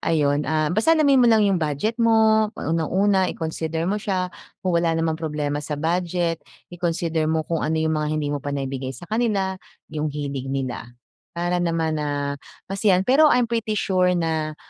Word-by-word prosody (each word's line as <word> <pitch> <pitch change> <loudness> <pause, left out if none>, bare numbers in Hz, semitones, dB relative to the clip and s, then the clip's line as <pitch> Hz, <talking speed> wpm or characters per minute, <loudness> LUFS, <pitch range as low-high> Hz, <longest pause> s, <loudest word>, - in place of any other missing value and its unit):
ayun, 145 -3 +1
ah, 155 0 +1
basta 320 - +3
alamin 280 -4 +4
mo 240 - +5
lang 220 -2 +5
yung 190 -4 +2
budget 160 - -1
mo, 220 -1 +4
unang-una, 185 +5 +1
i-consider 160 0 -3
mo 205 +3 -1
siya. 185 -3 -2 0.3
Kung 185 - +1
wala 170 -1 +2
namang 165 0 -1
problema 150 -2 -2
sa 150 0 -4
budget, 170 +1 -1 0.3
i-consider 165 -2 -1
mo 160 -1 0
kung 165 -1 -2
ano 160 +1 0
yung 160 0 +1
mga 150 -1 -1
hindi 145 -1 -1
mo 145 - -2
pa 145 - -6
naibigay 135 -2 -4
sa - - -10
kanila, 200 -3 -1 0.3
yung 155 0 -1
hilig 140 -2 -4
nila, 130 -3 -3 0.5
Para 175 +1 0
naman, 165 -2 0
ah, 145 -1 -2 0.3
masiyahan. 195 -1 +2
Pero 290 +6 +5
I'm 250 -3 +3
pretty 225 -2 -2
sure 185 -2 +2
na 160 -2 -1
165 Hz, 175 wpm, -23 LUFS, 150-195 Hz, 0.5 s, mo